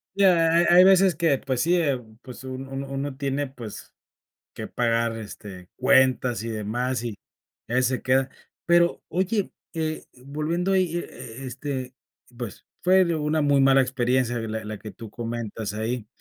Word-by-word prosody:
Ya. 180 -4 +5
Ha 165 - +4
ha - - +7
hay 180 - +9
veces, 190 -2 +5
que 160 -3 +2
pues 130 -2 -1
sí, 170 +2 +3
eh, 145 -7 +1 0.2
pues 125 -1 -10
un 130 0 -6
uno 135 +1 -5
uno 135 0 -3
tiene, 140 0 -1
pues, 120 -5 -10 0.6
que - - -6
pagar, 115 -1 0
este, 100 -4 -9
cuentas 130 -3 +3
y 115 - -4
demás. 115 +3 -2
Y, 120 - -2 0.6
a 120 - -3
veces, 125 0 +3
se 130 +1 -1
queda 130 +1 +2 0.4
Pero 170 0 +3
oye, 190 +3 0 0.2
eh, 155 -1 -2 0.2
volviendo 160 +6 -1
ahí, 185 -3 +2
e - - 0
e 120 -5 -9
e - - -5
este, 130 0 -5 0.4
pues, 120 -5 -7 0.2
fue 185 +1 +5
una 155 0 0
muy 145 -1 +4
mala 135 0 +6
experiencia, 125 -1 0
la 110 -1 -4
la 105 0 -6
que 110 - -8
tú 115 -1 -10
comentas 115 -2 -4
ahí. 110 +1 -3
130 Hz, 175 wpm, -25 LUFS, 120-155 Hz, 0.6 s, hay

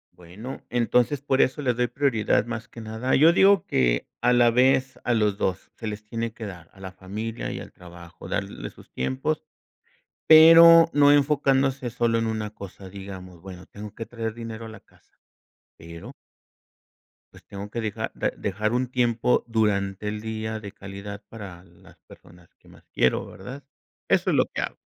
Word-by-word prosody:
Bueno, 95 +9 -10
entonces, 125 +3 +1
por 135 -2 +1
eso 140 +3 0
le 125 -2 +1
doy 120 +1 0
prioridad 115 -6 +1
más 120 0 -6
que 115 -1 -11
nada 110 +4 -1
Yo 160 +5 +6
digo 195 +2 +4
que, - - +1
a 120 +1 +3
la 120 -1 +5
vez, 130 +1 +2
a 120 - +1
los 105 -2 0
2 95 0 -2
se 110 - -7
les 105 0 -6
tiene 115 0 -4
que 115 -1 -8
dar, 90 -4 -10
a 95 - -20
la 95 -1 -8
familia 105 +5 -6
y - - -5
al - - -10
trabajo, 85 0 -13
darles 100 -12 -4
sus - - -18
tiempos, 135 - -2 0.8
pero 165 +1 +9
no 145 0 +5
enfocándose 140 -3 +2
solo 115 -1 0
en 115 - -1
una 110 -1 -3
cosa. 100 -2 -11
Digamos: 95 -3 -10
"Bueno, 90 -1 -11
tengo 105 0 -10
que 115 - -6
traer 115 -1 -5
dinero 115 -1 -7
a - - -8
la 110 - -11
casa", - - -30 0.6
pero 85 0 -10 1.2
pues - - -16
tengo 100 +1 -7
que 115 - -3
dejar, 110 +1 -4
da - - -1
dejar 110 +3 -2
un 125 +1 +1
tiempo 120 -1 +1
durante 105 -3 0
el 105 0 -4
día 110 0 -4
de 100 -2 -9
calidad 100 +1 -9
para 95 -6 -10
las 85 -2 -20
personas 85 0 -18
que - - -25
más - - -18
quiero, 65 - +1
¿verdad? 125 +9 -10 0.4
Eso - - +2
es - - +2
lo - - +3
que - - -5
hago. - - -4
110 Hz, 180 wpm, -24 LUFS, 100-125 Hz, 1.2 s, pero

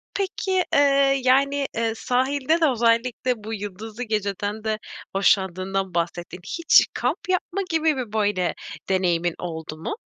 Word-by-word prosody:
peki, 380 -1 0 0.6
yani, 275 +2 +3
eee, 225 -1 +1
sahilde 270 +7 +1
de - - +6
özellikle 235 0 +1
bu 220 +1 -5
yıldızlı 210 +3 -6
geceden 210 -1 -2
de 215 -1 -1 0.4
hoşlandığından 190 -1 +1
bahsettin. 175 +1 -3 0.2
Hiç 335 - +6
kamp - - -2
yapma 370 +1 0
gibi 320 -2 +2
bir 240 -5 -5
böyle 205 -5 +1 0.4
deneyimin 175 -3 +1
oldu 160 -3 -6
mu? 160 - -4
220 Hz, 125 wpm, -24 LUFS, 190-260 Hz, 0.6 s, de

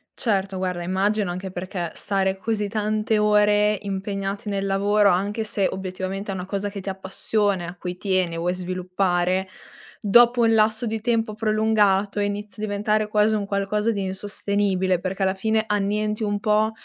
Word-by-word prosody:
Certo, 195 -4 -1
guarda, 180 -2 -2
immagino 195 +2 0
anche 185 +1 -5
perché 180 -2 -4
stare 195 -1 0
così 210 +2 -1
tante 215 0 0
ore 210 0 +3
impegnati 195 +1 -4
nel 195 -1 -1
lavoro, 200 +1 +3
anche 200 +5 0
se 205 -2 +1
obiettivamente 190 +1 -4
è - - -3
una 180 - -4
cosa 200 +1 -2
che 200 -1 -6
ti 195 - -7
appassiona 190 0 -1
e - - -5
a 175 - -8
cui 180 0 -5
tieni, 185 -3 0
vuoi 175 +2 0
sviluppare, 185 0 -1 0.5
dopo 240 +4 +5
un 225 -1 +4
lasso 220 +2 +2
di 220 0 -2
tempo 225 -2 0
prolungato 215 -2 +2
e 205 - +2
inizia 205 -1 -4
a - - 0
diventare 210 +1 0
quasi 210 +1 +3
un 205 -2 -1
qualcosa 205 +2 0
di 200 -2 -2
insostenibile, 190 -1 0
perché 190 +2 -3
alla 190 0 +2
fine 220 +2 0
annienti 210 +1 0
un 205 0 -1
po' 215 +1 +2
200 Hz, 170 wpm, -23 LUFS, 190-210 Hz, 0.5 s, dopo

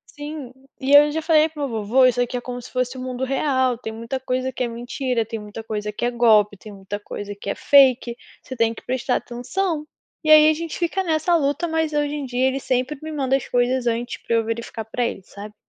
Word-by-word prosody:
Sim, 290 -3 -7 0.3
e 270 +1 0
eu 295 +1 +8
já 320 +1 -3
falei 315 -1 +4
para 300 -2 -4
o - - -2
meu 225 -4 -3
vô: - - -4
"Vô, 255 +6 +4
isso 245 -1 +3
aqui 245 0 -1
é - - -4
como 245 0 -6
se 245 - -11
fosse 255 0 -1
o - - -6
mundo 255 0 -4
real, 260 -2 +1
tem 220 - -6
muita 230 +4 -5
coisa 255 0 -2
que - - -6
é - - 0
mentira, 240 0 -2
tem 225 0 -5
muita 210 +1 -8
coisa 210 -1 -4
que 210 - -3
é 240 - +1
golpe, 220 -4 +4
tem 210 +2 -12
muita 200 +1 -6
coisa 205 0 -7
que 200 0 -7
é - - -1
fake, 260 -4 +4 0.2
você 260 - -9
tem 230 -1 +1
que - - -13
prestar 255 0 -1
atenção.", 300 +6 -3 0.4
e 310 - -1
aí 310 0 +8
a - - +2
gente 330 +1 -5
fica 350 +2 0
nessa 325 0 +1
luta, 290 +2 0
mas 320 -1 -1
hoje 295 -1 0
em 295 -2 -3
dia 250 +1 +1
ele 265 +1 -1
sempre 255 +2 -1
me 315 0 -6
manda 270 -3 0
as 270 - -2
coisas 245 0 +1
antes 235 +1 -2
pra 230 - -1
eu 225 -1 +1
verificar 225 0 -4
para 245 +3 -2
ele, 215 -5 -3
sabe. 205 +2 -11
255 Hz, 250 wpm, -22 LUFS, 230-290 Hz, 0.4 s, eu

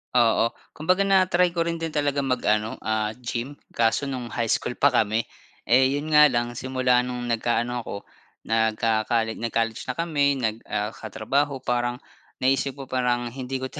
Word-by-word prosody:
Oo 115 -1 +4 0.2
kumbaga 185 +5 +1
na-try 180 -2 +3
ko 170 - +2
rin 170 0 -3
din 165 - -2
talagang 145 -3 -1
mag-ano, 110 -4 +1
ah, 110 0 -1
gym 125 +3 -5 0.2
kaso 115 +3 +1
no'ng 130 -3 -4
high 115 0 -2
school 125 - -1
pa 140 - +4
kami. 110 -2 +2 0.4
Eh, 130 +2 +4
'yon 150 +2 -4
nga 150 0 +8
lang 120 -3 -1
simula 125 0 +1
no'ng 125 -1 -3
nagkaano 120 +1 0
ako, 100 -3 -7 0.4
nagco-colle, 110 0 +1
nag-college 115 -1 -2
na 130 - -2
kami, 160 -4 0
nag 110 -4 -1
ah, 105 0 -2
katrabaho, 130 +6 -2
parang 120 0 0 0.5
naisip 135 +1 +1
ko 140 - -8
parang 120 -1 0
hindi 130 +1 -5
ko 130 0 -4
'to - - -8
125 Hz, 165 wpm, -25 LUFS, 115-140 Hz, 0.5 s, nga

